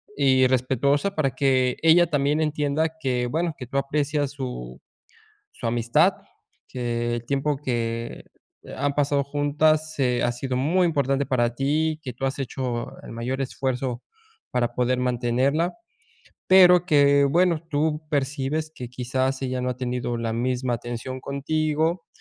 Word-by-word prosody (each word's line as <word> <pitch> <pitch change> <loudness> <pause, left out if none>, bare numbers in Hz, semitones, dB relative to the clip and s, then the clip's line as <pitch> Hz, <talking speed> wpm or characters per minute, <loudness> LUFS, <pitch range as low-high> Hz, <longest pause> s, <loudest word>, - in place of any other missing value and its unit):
y 130 -2 +4
respetuosa 135 - +1
para 140 -4 +1
que 130 -1 +1
ella 165 +2 +6
también 145 0 +1
entienda 150 0 0
que 125 -3 0
bueno, 165 +4 -1
que 125 - -8
tú 135 - -3
aprecias 145 0 0
su 125 - -6 0.7
su - - -6
amistad 115 0 +3 0.5
que 120 -1 -2
el 120 0 -7
tiempo 140 +2 0
que 115 -3 -3 0.5
han 145 0 -1
pasado 140 -1 +1
juntas, 150 +2 +1
eh, 125 -3 +1
ha 120 - +2
sido 125 +1 -3
muy 170 +8 +2
importante 140 -3 0
para 120 -2 +1
ti, 150 +4 0
que 130 -4 -5
tú 135 +3 -3
has 135 - -3
hecho 125 -2 -4
el - - -9
mayor 125 +3 -3
esfuerzo 130 -2 -2 0.5
para 120 -1 -1
poder 125 0 +1
mantenerla. 125 +6 0 0.7
Pero, 180 -2 +7
que 140 -3 +5
bueno, 170 +3 +2
tú 155 +1 -1
percibes 145 +2 -1
que 125 - -7
quizás 130 +2 -2
ella 130 -1 -2
no 125 0 -1
ha 125 - -4
tenido 125 -1 -2
la 115 -1 -2
misma 125 +1 -1
atención 120 +2 -6
contigo 155 +4 -1
135 Hz, 145 wpm, -24 LUFS, 125-150 Hz, 0.7 s, Pero